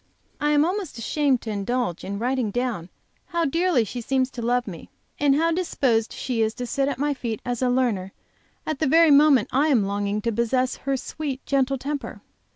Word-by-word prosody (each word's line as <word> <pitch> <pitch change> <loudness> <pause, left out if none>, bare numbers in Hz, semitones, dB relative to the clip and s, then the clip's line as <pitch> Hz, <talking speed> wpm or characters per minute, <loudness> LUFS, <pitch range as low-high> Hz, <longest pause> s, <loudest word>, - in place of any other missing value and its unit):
I 295 -1 +1
am 295 0 +4
almost 365 - -3
ashamed 270 +2 +1
to 220 - -5
indulge 205 -2 -2
in 200 +1 -4
writing 245 0 0
down 230 -6 -2 0.4
how 340 -1 0
dearly 330 -3 +2
she 240 +3 -6
seems 260 +2 0
to 240 - -6
love 245 +1 +1
me, 175 -6 -9 0.3
and 285 -1 +4
how 330 +3 +2
disposed 265 -10 0
she 245 -3 -2
is 220 0 0
to 250 - -4
sit 275 +3 0
at 280 -3 -2
my 290 +2 0
feet 235 -5 -4
as 245 -1 -2
a 255 - +2
learner 235 -7 0 0.5
at 310 -3 -3
the 310 - +1
very 325 +2 +6
moment 280 -5 +5
I 280 +4 +3
am 245 -9 +3
longing 200 +1 -1
to 230 - 0
possess 240 +3 0
her 275 0 -2
sweet, 275 0 -5
gentle 275 -1 +1
temper. 285 +2 -5
255 Hz, 200 wpm, -24 LUFS, 230-290 Hz, 0.5 s, very